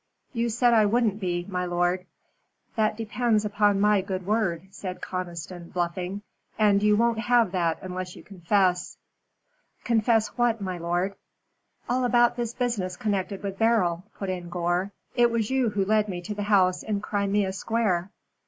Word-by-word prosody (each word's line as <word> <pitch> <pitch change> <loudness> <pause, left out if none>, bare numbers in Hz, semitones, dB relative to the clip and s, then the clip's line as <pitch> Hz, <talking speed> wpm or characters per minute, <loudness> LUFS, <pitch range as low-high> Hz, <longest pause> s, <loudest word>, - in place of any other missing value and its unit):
"You 235 -1 0
said 240 +1 +3
I 215 -2 +5
wouldn't 215 -2 +1
be, 175 -3 -2
my 180 -2 -2
lord." 175 +1 0 0.7
"That 215 -1 +1
depends 225 -1 0
upon 205 -1 +2
my 210 -1 +4
good 190 -1 -4
word," 190 -5 0
said 185 -2 -6
Conniston, 175 -1 -6
bluffing; 180 +3 -3 0.3
"and 205 -2 +4
you 210 0 +4
won't 230 0 +2
have 235 -3 +3
that 170 -3 0
unless 185 -1 -5
you - - -12
confess." 185 -1 0 0.9
"Confess 225 -1 +2
what, 240 -2 +1
my 185 -3 -4
lord?" 175 +3 -1 0.7
"All 255 +1 +1
about 240 -1 +4
this 235 -1 -3
business 210 -8 -2
connected 200 -1 -2
with 195 -1 -5
Beryl," 210 -7 +2
put 195 -2 -3
in 175 -2 -5
Gore. 175 +2 -1 0.2
"It 240 -1 +5
was 230 0 -1
you 260 -3 +2
who 200 -2 0
led 215 +1 +2
me 180 -2 -3
to 210 - -4
the 205 - -5
house 185 -3 +4
in 210 -2 -2
Crimea 200 -2 0
Square." 195 -3 0
200 Hz, 160 wpm, -26 LUFS, 180-225 Hz, 0.9 s, I